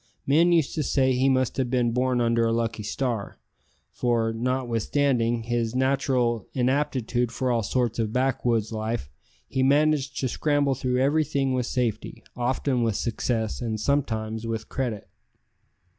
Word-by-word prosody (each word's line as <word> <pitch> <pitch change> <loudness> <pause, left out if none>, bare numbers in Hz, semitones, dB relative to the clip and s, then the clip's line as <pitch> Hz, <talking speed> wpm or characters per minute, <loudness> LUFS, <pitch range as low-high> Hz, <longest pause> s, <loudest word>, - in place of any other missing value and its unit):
Men 165 +5 +4
used 165 -5 +2
to 155 - -1
say 130 -2 +2
he 130 +2 +2
must 130 -1 +1
have 130 -2 0
been 120 -2 +1
born 125 0 +1
under 115 0 +2
a - - +1
lucky 115 -1 -1
star, 115 -1 -3 0.5
for, 115 -2 0
notwithstanding 120 0 0
his 120 0 -1
natural 130 -4 +1
inaptitude 125 -2 0
for 130 +2 -1
all 115 -1 +1
sorts 120 +1 -1
of 110 -2 0
backwoods 120 -3 0
life, 110 - -3 0.4
he 130 - -1
managed 145 0 +2
to 130 - +1
scramble 145 +1 +1
through 125 -1 -1
everything 140 -1 +1
with 125 -1 -1
safety, 120 -4 -2
often 125 +1 0
with 115 -3 +1
success, 115 0 -2
and 110 -2 -2
sometimes 110 -4 -1
with 110 -1 -4
credit. 120 -6 -3
125 Hz, 145 wpm, -25 LUFS, 115-135 Hz, 0.5 s, Men